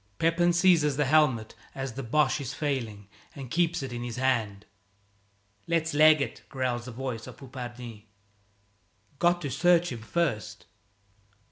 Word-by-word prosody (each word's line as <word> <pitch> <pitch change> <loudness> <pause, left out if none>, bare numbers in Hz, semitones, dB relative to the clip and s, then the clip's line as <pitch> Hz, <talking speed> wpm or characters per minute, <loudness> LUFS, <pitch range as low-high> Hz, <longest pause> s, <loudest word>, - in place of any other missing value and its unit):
Pepin 170 +2 +2
seizes 170 -5 +3
the 150 - +2
helmet 135 -6 +2 0.2
as 135 -2 -4
the 135 - -5
Boche 140 +3 +1
is 140 +2 -5
failing 115 -10 -3 0.3
and 135 -4 -8
keeps 170 -3 +1
it 130 -2 -5
in 120 - -5
his 120 -1 -5
hand. 115 -6 -1 1.0
"Let's 165 -2 0
leg 155 0 +6
it," - - -4
growls 125 -3 -2
the 130 - -7
voice 120 -2 -5
of - - -11
Poupardin. 120 -4 -9 1.1
"Got 175 0 +2
to 140 - -3
search 175 +5 +3
him 115 - -6
first!" 110 -2 -2
135 Hz, 145 wpm, -28 LUFS, 120-155 Hz, 1.1 s, leg